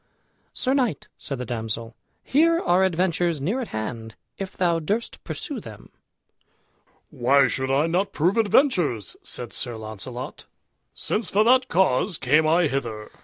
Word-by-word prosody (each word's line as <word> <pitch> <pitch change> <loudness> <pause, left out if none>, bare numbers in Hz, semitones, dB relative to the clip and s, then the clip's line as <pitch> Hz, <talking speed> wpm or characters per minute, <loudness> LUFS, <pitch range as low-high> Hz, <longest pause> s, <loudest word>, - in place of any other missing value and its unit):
"Sir 260 - 0
knight," 245 - 0
said 140 - -5
the 125 - -5
damsel, 115 -1 -4 0.3
"here 330 +4 +3
are 180 - +3
adventures 175 -2 +1
near 190 - -1
at 240 - -4
hand, 110 +1 -5 0.2
if 195 -1 -6
thou 170 -2 +2
durst 210 +9 -3
pursue 290 -7 -5
them." 110 - -12 1.2
"Why 135 +3 +4
should 130 0 -2
I 140 +3 +3
not 180 +4 0
prove 175 +6 +1
adventures?" 195 - +2
said - - -6
Sir 120 -2 -2
Launcelot, 110 - -7 0.5
"since 220 - -1
for 210 +2 +3
that 255 +2 +4
cause 180 0 +2
came 150 +5 +3
I 170 +2 +4
hither." 115 -7 -3
160 Hz, 145 wpm, -24 LUFS, 125-200 Hz, 1.2 s, Why